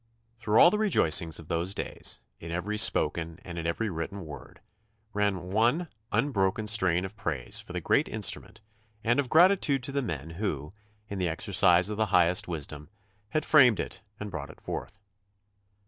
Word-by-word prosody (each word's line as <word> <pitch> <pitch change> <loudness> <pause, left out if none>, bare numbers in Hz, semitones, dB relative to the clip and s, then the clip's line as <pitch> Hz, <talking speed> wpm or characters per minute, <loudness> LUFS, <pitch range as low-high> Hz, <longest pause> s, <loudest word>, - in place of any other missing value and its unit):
Through 110 -1 +2
all 170 - +8
the 210 - -1
rejoicings 85 - +3
of 80 - -12
those 85 +4 -2
days, - - -1 0.2
in 85 - -9
every 95 +6 -3
spoken 85 -4 +2
and 85 -1 -7
in 85 - -3
every 110 +7 -2
written 90 +1 -5
word, 75 -1 -11 0.5
ran 95 -3 -1
one 120 - +1 0.2
un 120 +7 0
broken 95 0 0
strain 95 -5 +2
of 95 - -9
praise 75 - -2
for - - -11
the - - -3
great - - +2
instrument - - -2 0.4
and 120 +4 +2
of 135 -3 -1
gratitude 160 -5 +4
to 140 - -5
the 140 0 -1
men 80 - -5
who, 80 -4 -4 0.3
in 100 -2 -6
the 90 -2 0
exercise 85 +2 +3
of 105 - -4
the 110 0 +1
highest 90 -2 +3
wisdom, 75 -2 -6 0.4
had 155 +7 -1
framed 125 -8 +5
it - - -4 0.2
and 105 -1 -6
brought 75 -6 -6
it - - -14
forth. 100 - -7
95 Hz, 180 wpm, -28 LUFS, 85-115 Hz, 0.5 s, all